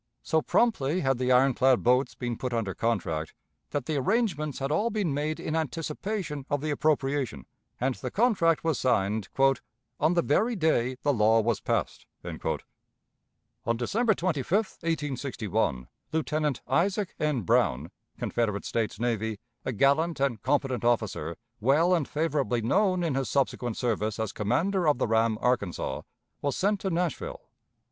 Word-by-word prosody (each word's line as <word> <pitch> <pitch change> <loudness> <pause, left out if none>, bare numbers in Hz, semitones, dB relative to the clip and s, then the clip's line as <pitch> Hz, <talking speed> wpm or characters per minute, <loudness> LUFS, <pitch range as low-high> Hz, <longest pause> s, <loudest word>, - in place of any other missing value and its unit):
So 160 - +2
promptly 180 - +1
had 135 -2 +1
the 130 0 +1
iron 130 +1 +5
clad 130 0 +3
boats 125 +3 +3
been 120 -2 -3
put 125 +1 -4
under 110 -5 -1
contract, 80 -9 -2 0.3
that 145 -4 -2
the 155 -2 -1
arrangements 155 - 0
had 135 +1 -2
all 210 +10 +2
been 205 -9 -1
made 150 +2 -2
in 155 - -3
anticipation 160 +1 -3
of 145 -1 0
the 155 0 -1
appropriation, 140 - 0 0.3
and 130 +2 +1
the 125 - -5
contract 190 - +2
was 160 -3 0
signed 105 -4 +1 0.7
"on 160 +4 +3
the 170 - +3
very 220 - +2
day 130 - +1
the 145 - +3
law 110 -1 +4
was 115 -1 +1
passed." - - -2 0.2
On 115 +1 -7
December 220 - +1
25, 165 -6 -2
1861, 140 - -1 0.2
Lieutenant 155 -3 -1
Isaac 195 +3 +1
N. 150 -5 +1
Brown, 75 -4 +1 0.3
Confederate 105 -4 -1
States 110 -2 -2
Navy, 110 -2 -1 0.3
a - - -2
gallant 140 +8 +2
and 130 -6 0
competent 135 -3 0
officer, 110 -9 0 0.2
well 150 +10 +3
and 165 -6 +1
favorably 140 -7 0
known 185 - +2
in 165 -4 0
his 135 0 -1
subsequent 125 -4 0
service 110 -3 -1
as 110 -3 -2
commander 165 - +1
of 150 - +4
the - - +1
ram 110 0 +2
Arkansas, 100 - 0 0.4
was 140 -1 -1
sent 205 +1 +1
to 190 - -2
Nashville. 170 -3 -2
135 Hz, 150 wpm, -28 LUFS, 115-160 Hz, 0.7 s, iron